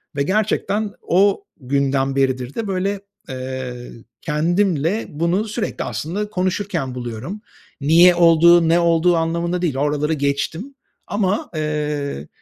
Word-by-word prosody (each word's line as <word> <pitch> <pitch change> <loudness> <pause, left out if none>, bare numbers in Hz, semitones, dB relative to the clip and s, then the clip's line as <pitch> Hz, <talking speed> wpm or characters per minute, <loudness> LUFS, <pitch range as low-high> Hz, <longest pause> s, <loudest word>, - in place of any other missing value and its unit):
ve 140 - +1
gerçekten 210 +2 0
o 200 - +2 0.2
günden 135 0 0
beridir 130 -1 0
de, 225 -2 -3
böyle, 195 +1 -2 0.3
eee, 130 -1 -6 0.3
kendimle 170 +4 0
bunu 170 +7 0
sürekli 215 +1 -3
aslında 200 +7 -4
konuşurken 180 -8 -2
buluyorum. 125 - -6 0.4
Niye 170 +5 +6
olduğu, 170 0 +5
ne 170 +1 +4
olduğu 170 +1 +3
anlamında 170 +2 -1
değil, 155 -7 -1
oraları 150 +2 0
geçtim. 155 - -2 0.3
Ama, 205 0 -1
eee, 150 - -3
165 Hz, 115 wpm, -20 LUFS, 140-190 Hz, 0.4 s, Niye